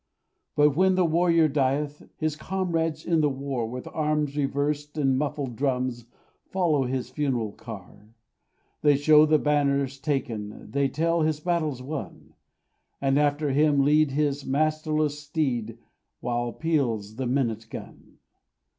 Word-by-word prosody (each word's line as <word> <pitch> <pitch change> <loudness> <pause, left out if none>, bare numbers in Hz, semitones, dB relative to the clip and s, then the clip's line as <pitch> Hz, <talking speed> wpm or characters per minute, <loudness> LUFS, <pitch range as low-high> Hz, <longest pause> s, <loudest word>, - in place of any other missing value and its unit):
But, 145 -1 +4
when 185 +2 +4
the 185 -1 +3
warrior 165 0 +3
dieth, 145 +1 -1
His 155 -1 -1
comrades 165 -2 -2
in 165 -2 +2
the 150 - +3
war, 135 -4 -3
With 125 +1 -6
arms 150 -2 0
reversed 145 +1 -1
and 135 -3 +2
muffled 140 -3 -2
drums, 125 -2 -1 0.4
Follow 165 -8 +1
his 125 0 -3
funeral 130 -6 -1
car; 105 0 -11 0.7
They 145 -1 +5
show 150 +2 +6
the 155 0 +5
banners 140 -2 +1
taken, 120 -8 -3
They 140 0 +2
tell 165 +5 0
his 155 -1 +1
battles 155 -6 -1
won, 145 +2 -7 0.7
And 135 +1 +2
after 145 0 +1
him 145 0 +3
lead 150 +1 +4
his 145 0 0
masterless 155 +1 0
steed, 135 -7 -2 0.4
While 120 0 -2
peals 120 -10 -1
the 130 -1 -2
minute 115 -4 -1
gun. - - -10
145 Hz, 135 wpm, -26 LUFS, 130-155 Hz, 0.7 s, show